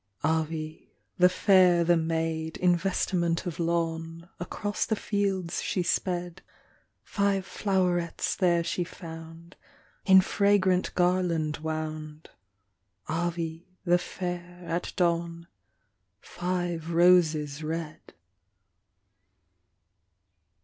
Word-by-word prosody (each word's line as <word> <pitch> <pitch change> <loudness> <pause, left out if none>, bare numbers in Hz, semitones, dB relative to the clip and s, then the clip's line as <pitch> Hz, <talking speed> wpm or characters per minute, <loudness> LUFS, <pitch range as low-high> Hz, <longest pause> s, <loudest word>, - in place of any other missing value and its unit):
Avis, 160 0 -1 0.4
the 180 0 +7
fair, 180 -2 +4
the 175 +1 +4
maid, 160 -1 -2
In 180 -1 +3
vestiment 170 -2 0
of 175 -3 -5
lawn; 165 0 -2
Across 205 +4 -3
the 220 - +1
fields 195 -4 -1
she 180 - -1
sped, 175 0 -2 0.6
Five 200 -2 0
flowerets 180 -4 0
there 175 -2 +2
she 175 - -1
found, 165 -1 -10 0.5
In 190 -1 +9
fragrant 190 -1 +2
garland 175 -4 +1
wound, 155 0 -5 0.8
Avis, 165 0 -2 0.2
the 175 0 +4
fair, 175 0 -6
at 170 +1 -3
dawn, 170 -1 0 0.7
Five 175 - -3
roses 165 -4 +3
red. 155 0 -6
170 Hz, 90 wpm, -28 LUFS, 165-180 Hz, 0.8 s, In